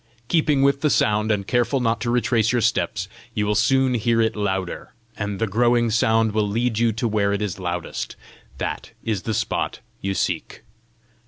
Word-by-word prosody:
Keeping 150 -4 +3
with 140 0 +3
the 150 - +3
sound, 105 -3 +2
and 100 -2 0
careful 120 +5 +1
not 115 -2 0
to 120 - -1
retrace 115 -2 +2
your 125 - +2
steps, 105 -4 0 0.3
you 105 - +1
will 105 - +1
soon 130 +5 +3
hear 115 0 +1
it 110 -1 +2
louder, 95 -3 -3 0.2
and 100 -1 -3
the 115 - 0
growing 120 +2 +2
sound 110 0 +3
will 105 0 +1
lead 115 +2 0
you 115 -1 +3
to 115 +3 -1
where 105 -2 +1
it 100 - -1
is 100 -2 -3
loudest: 85 -9 -4 0.4
that - - -4
is 110 -5 -1
the 110 - -3
spot 115 - -1 0.2
you 95 0 -2
seek. - - -2
110 Hz, 185 wpm, -23 LUFS, 105-120 Hz, 0.4 s, Keeping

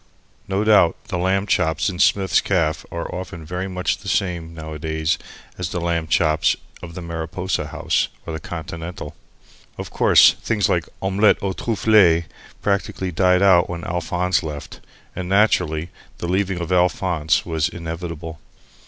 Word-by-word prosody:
No 100 +2 0
doubt 105 -6 +5
the 95 - -2
lamb 95 +2 +1
chops 80 -3 +1
in 90 -3 -3
Smith's 95 -2 +3
Caff 80 -5 0
are 85 0 -5
often 90 -3 -7
very 90 +3 -4
much 90 -2 -2
the 100 - -12
same, 90 -4 -1
nowadays, 80 0 -3 0.4
as 90 -2 -2
the 90 - -3
lamb 85 -1 -1
chops 80 -1 +2 0.3
of 85 -1 -9
the 90 - -6
Mariposa 85 +3 -3
House - - 0 0.2
or 80 - -5
the 80 - -4
Continental. 80 0 -7 0.6
Of - - -7
course, - - +6
things 105 -4 +1
like 85 -2 0
Omelette 100 +2 +3
aux 95 -1 -1
Trufles 100 -6 +3 0.4
practically 100 -2 -1
died 90 +2 +3
out 90 -3 +5
when 85 -1 -5
Alphonse 90 +1 0
went. 75 -4 -7 0.4
And, 90 0 -5
naturally, 90 -5 +2 0.3
the 85 - -4
leaving 95 0 0
of 85 +1 -4
Alphonse 90 -3 +1
was 80 -2 0
inevitable. 85 -1 -6
90 Hz, 150 wpm, -21 LUFS, 80-95 Hz, 0.6 s, course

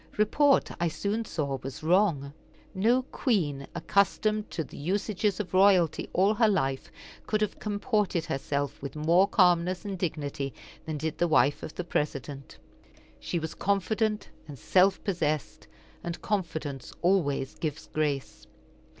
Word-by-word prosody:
Report, 275 +7 +3
I 170 - +2
soon 200 +8 -2
saw, 140 -8 -2
was 135 +3 -7
wrong. 160 -5 +2 0.4
No 230 +7 +3
queen, 160 - -1
accustomed 215 +1 +1
to 160 - -3
the - - -13
usages 200 +5 -1
of 185 -5 -4
royalty 185 -4 +4
all 195 +3 +3
her 225 +1 +3
life, 135 -10 0 0.4
could 215 - +1
have 210 - -1
comported 205 -4 0
herself 140 +1 -2
with 140 +1 -6
more 170 +5 +4
calmness 180 0 +3
and 195 -3 -4
dignity 145 -5 -3 0.3
than 155 -1 -2
did 155 +1 -3
the 175 - +3
wife 145 -3 +3
of 155 - -7
the 180 - -3
President. 140 -4 -3 0.6
She 175 - -3
was 160 -1 -4
confident 210 +2 0 0.2
and 145 -3 -9
self 190 - +3
possessed, 155 -6 -2 0.4
and 170 0 -4
confidence 160 -9 -3
always 150 -8 +1
gives 155 -1 -4
grace. 145 -3 -3
175 Hz, 140 wpm, -28 LUFS, 150-205 Hz, 0.6 s, royalty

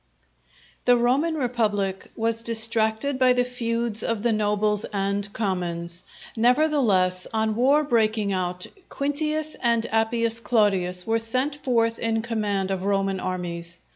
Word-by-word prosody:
_ - - -42
The 245 -1 +5
Roman 270 +7 +1
Republic 215 -8 -1
was 225 0 -1
distracted 230 +3 +1
by 255 -1 +5
the 250 0 +2
feuds 235 -2 -2
of 230 -2 -2
the 240 - +2
nobles 210 -1 +1
and 200 0 -2
commons. 175 -4 -2 0.3
Nevertheless, 230 -8 +2
on 220 -1 0
war 275 +6 +3
breaking 220 -6 +1
out, 180 -1 -2 0.2
Quintius 305 +2 -2
and 235 -2 +2
Appius 230 +1 +2
Claudius 190 -6 +1
were 225 0 +1
sent 255 +6 -1
forth 230 -5 0
in 225 -1 -1
command 205 -4 -1
of 190 -1 -2
Roman 195 -1 0
armies. 170 -2 -5
225 Hz, 135 wpm, -24 LUFS, 195-240 Hz, 0.3 s, The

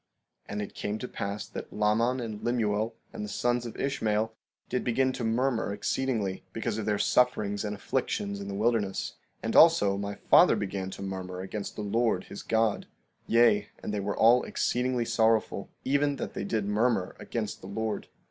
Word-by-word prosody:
16:20 - - -9
And 105 - -2
it 100 - -8
came 105 +1 -3
to 125 - -5
pass 100 -2 -4
that - - -7
Laman 110 +4 +2
and 110 -3 -5
Lemuel 110 -2 0 0.2
and - - -5
the 105 - -5
sons 120 +1 0
of 115 - -9
Ishmael 110 -5 0 0.3
did 125 - -1
begin 130 +2 +2
to 125 -1 -4
murmur 115 0 +1
exceedingly, 105 -1 -1
because 115 -1 -2
of 105 - -4
their 105 -1 +2
sufferings 105 -4 +2
and 105 0 -3
afflictions 100 0 -2
in 100 - -6
the 100 - -4
wilderness; 105 -2 0 0.3
and 115 - -2
also 130 -13 +6
my 100 0 -3
father - - +6
began 95 -1 -3
to 95 - -7
murmur 95 -1 -5
against 100 +2 -5
the 105 - -4
Lord 110 -2 +1
his 100 - -8
God; 110 -2 +1 0.4
yea, 115 -3 +4
and 105 - -3
they 105 - -1
were 100 +1 -2
all 120 +3 +6
exceedingly 125 -1 0
sorrowful, 115 -1 +1 0.2
even 145 +1 +2
that - - -5
they - - -3
did 105 0 -1
murmur 105 -2 +1
against 110 -3 -4
the 95 - -9
Lord. 110 +2 -3
110 Hz, 185 wpm, -29 LUFS, 100-120 Hz, 0.4 s, also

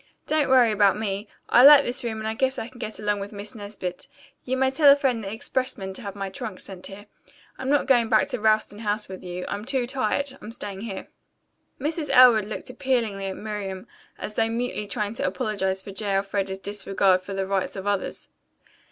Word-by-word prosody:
"Don't 305 -3 +1
worry 250 -3 +6
about 205 -2 +4
me. 205 -1 -3 0.2
I 245 - +6
like 285 0 +10
this 250 +1 -2
room 225 -2 -3
and 220 0 -4
I 220 - -1
guess 265 +3 0
I 225 - -4
can 250 0 -15
get 215 - -6
along 210 -1 0
with 200 +1 -6
Miss 205 0 -8
Nesbit. 200 -4 -6 0.4
You 260 +1 -1
may 265 0 +2
telephone 280 -4 +5
the 195 -2 -5
expressman 225 -3 -3
to 190 - -5
have 200 -3 -6
my 195 -1 -4
trunk 185 -1 -6
sent 190 -2 -6
here. 205 +1 -10 0.5
I'm 265 - -3
not 290 0 +3
going 240 -4 +3
back 225 +5 +4
to 250 -3 -2
Ralston 215 -1 +2
House 210 -1 -2
with 190 0 -9
you. 180 0 -5
I'm 205 - -4
too 255 +1 0
tired. 265 +2 -1
I'm 270 - -15
going 210 - -9
to 230 - -9
stay 200 -4 -6
here." 210 -4 -6 0.7
Mrs. 300 +1 -2
Elwood 250 -5 +7
looked 215 - -6
appealingly 225 -7 -1
at 190 - -5
Miriam, 200 -3 -5 0.3
as 210 - -6
though 225 +1 +1
mutely 230 -2 -2
trying 210 -1 -2
to - - -1
apologize 190 0 -2
for 200 - -8
J. 200 0 -2
Elfreda's 195 0 -1
disregard 195 -1 +1
for 195 +1 -7
the 195 0 -1
rights 195 +1 -1
of 190 0 -6
others. 205 -1 -2
215 Hz, 210 wpm, -25 LUFS, 195-250 Hz, 0.7 s, like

